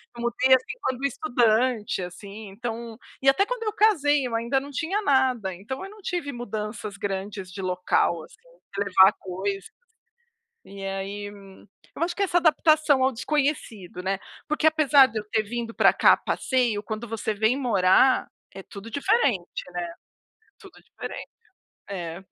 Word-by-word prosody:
Eu 235 - -7
mudei, 260 +2 +4
assim, 260 - -3
quando 260 +1 -2
estudante, 245 -6 +1
assim. 200 +4 -8
Então 230 +2 -6 0.2
e 270 - -2
até 385 +9 +3
quando - - -4
eu 430 -2 -2
casei 295 -11 +3
eu 245 - -4
ainda 235 +4 +1
não 285 +1 -9
tinha 330 +10 -1
nada. 260 - +2
Então, 210 +9 -7
eu 390 - -8
não 425 0 -15
tive 350 -7 -3
mudanças 215 -3 -5
grandes 195 -1 -5
de 195 - -7
local, 180 -2 0
assim, - - -16 0.4
de 200 - +1
levar 190 +1 +6
coisas. 195 +1 -4 1.0
E 195 0 -10
aí, 195 +1 -4
hum, 195 -1 -15 0.3
eu - - -1
acho 345 +1 -2
que 400 - 0
essa 355 -2 +1
adaptação 310 -4 +4
ao 260 - +3
desconhecido, 245 - -2
né. 190 +1 -1 0.3
Porque 305 0 -1
apesar 295 -3 +6
de 225 -3 -4
eu 210 - -9
ter 220 - +2
vindo 230 +1 -5
pra - - +5
cá - - +6
a - - +2
passeio, 240 -6 0
quando 215 +3 -5
você 220 -1 -2
vem 220 +5 +1
morar, 235 -1 +4 0.3
é 195 - -8
tudo 200 +4 -10
diferente, 280 - 0
né? 175 0 -2 0.7
Tudo 390 -6 -15
diferente. - - -8 0.6
É. 175 -3 -5
230 Hz, 165 wpm, -25 LUFS, 200-280 Hz, 1.0 s, levar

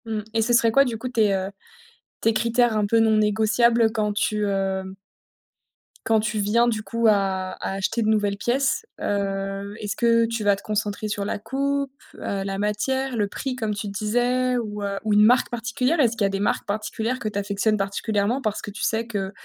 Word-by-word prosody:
Mmh 220 -1 -2
et 225 - +2
ce 235 +2 +1
serait 230 -1 +4
quoi 275 +4 +6
du 235 -3 -3
coup 250 +3 -5
tes, 220 -5 +2
heu, 190 +1 -3 0.7
tes 225 - +3
critères 235 +1 +2
un 210 -1 +2
peu 225 +2 +3
non 220 -1 +4
négociables 220 +2 +3
quand 210 -2 0
tu, 210 0 0
heu 195 -1 -1 1.2
quand 225 -1 +3
tu 215 0 -1
viens 225 +4 +3
du 220 -2 0
coup 230 +3 -2
à 190 -3 +1
à - - -2
acheter 195 +4 -1
de 215 - 0
nouvelles 205 -2 +1
pièces? 270 - 0
Heu, 195 0 -2
est-ce 210 0 -4
que 230 0 +3
tu 230 -1 -3
vas 205 -1 +4
te 200 - -13
concentrer 210 0 -2
sur 205 -1 -3
la - - -2
coupe, 275 +5 -2 0.2
heu, 195 -1 -3
la 195 0 -3
matière, 245 +6 -1
le 210 -3 +1
prix 260 +5 -4
comme 220 -4 -2
tu 205 - -4
disais 245 +5 0
ou, 210 -3 -4
heu, 200 0 -2
ou 215 -1 +1
une 210 0 +6
marque 245 +3 +4
particulière? 250 +6 -1
Est-ce 235 -4 +3
qu'il 205 - +2
y - - +2
des 195 - -2
marques 205 - 0
particulières 220 +4 -2
que 215 - -2
tu 205 - -6
affectionnes 205 +2 0
particulièrement? 205 +4 -1
Parce 215 -4 -2
que 205 - -6
tu 215 - -9
sais 225 +1 0
que, 200 -4 -3
215 Hz, 210 wpm, -24 LUFS, 205-235 Hz, 1.2 s, quoi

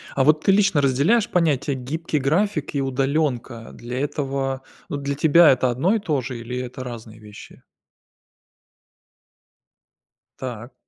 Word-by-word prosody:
А 135 - +3
вот 155 +2 +3
ты 195 - +4
лично 195 -6 +3
разделяешь 145 - +2
понятия: 150 -5 +1
гибкий 150 +4 -3
график 155 +2 0
и 140 - +1
удаленка, 135 -3 -1
для 125 +2 -6
этого 135 -2 -2 0.3
Ну, 145 - -3
для 140 0 -3
тебя 160 +3 +6
это 130 -1 +2
одно 165 - +1
и - - +1
то 150 -9 -1
же 120 0 -6
или 125 +2 -6
это 125 0 -6
разные 115 -2 -9
вещи? 105 -1 -13 2.8
Так. 120 -1 -7
135 Hz, 140 wpm, -22 LUFS, 125-155 Hz, 2.8 s, тебя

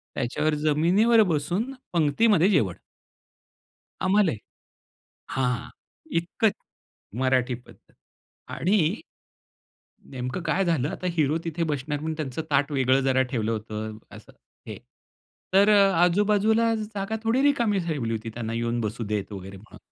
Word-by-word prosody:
त्याच्यावर 150 +5 -1
जमिनीवर 195 +10 +4
बसून 180 - -1 0.2
पंगतीमध्ये 175 +4 +3
जेवण. 110 - +2 1.3
आम्हालाही. 185 - +2 0.9
हां, 125 -2 -1 0.5
इतकं 210 +5 0 0.7
मराठी 130 -1 +1
पद्धत. 125 - -18 0.6
आणि 185 0 +1 1.2
नेमकं 125 +6 -4
काय 180 +4 +1
झालं 155 -5 +1
आता 180 - -4
हीरो 155 +1 +2
तिथे 165 +1 -2
बसणार 145 +1 -3
म्हणून 160 +1 -3
त्यांचं 150 0 -3
ताट 145 +2 +2
वेगळं 130 -1 +2
जरा 130 0 +2
ठेवलं 115 -3 -1
होतं 110 0 -5 0.2
असं - - -14 0.4
हे. - - -6 0.8
तर 200 +2 +6
अ, 200 -2 +5
आजू-बाजूला 210 +5 +3
जागा 215 0 -4
थोडी 235 +4 +2
रिकामी 235 -8 +2
ठेवली 135 -8 -2
होती 110 +1 -4
त्यांना 115 -1 -4
येऊन 115 +1 -1
बसू 110 +2 -3
देत 100 0 -3
वगैरे 95 0 -8
म्हणून. 105 - -15
155 Hz, 125 wpm, -25 LUFS, 125-200 Hz, 1.3 s, तर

